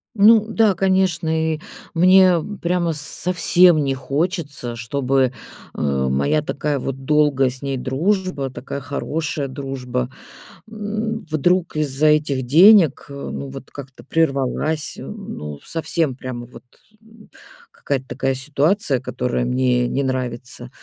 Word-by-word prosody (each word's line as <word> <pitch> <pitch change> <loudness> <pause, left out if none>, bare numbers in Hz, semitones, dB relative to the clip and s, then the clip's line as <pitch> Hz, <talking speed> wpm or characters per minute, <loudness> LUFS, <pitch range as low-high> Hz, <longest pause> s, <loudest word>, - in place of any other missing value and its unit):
Ну 215 +1 +6
да, 220 -3 +2
конечно, 185 -4 +1 0.3
и - - -10 0.4
мне 185 +1 +6 0.3
прямо 170 -1 0
с 150 - -3
совсем 175 0 +3
не 135 -1 0
хочется, 140 -3 -3
чтобы, 130 +2 0 0.4
э, - - -8
моя 70 - +1
такая 145 0 -2
вот 135 0 -5
долгая 145 -3 +3
с 130 +2 -9
ней 135 -1 -2
дружба, 145 +2 -1
такая 135 +2 -6
хорошая 145 +1 -3
дружба, 130 -2 -4 0.6
м, 220 +1 -4
вдруг 175 +3 +1
из-за 150 0 +1
этих 145 -4 +2
денег, 170 - +6
э, - - -9
ну, 140 0 -6
вот 135 0 -10
как-то 135 -2 -11
прервалась. 150 0 -1
Ну, 75 -1 -7
совсем 165 -3 -1
прямо 125 -2 -7
вот, 125 - -14 0.4
м, 220 0 -19 0.4
какая-то 135 -2 -3
такая 135 0 -1
ситуация, 145 - +1
которая 125 -1 -2
мне 125 -1 +1
не 140 - -1
нравится. 125 -2 -4
140 Hz, 125 wpm, -20 LUFS, 130-170 Hz, 0.6 s, Ну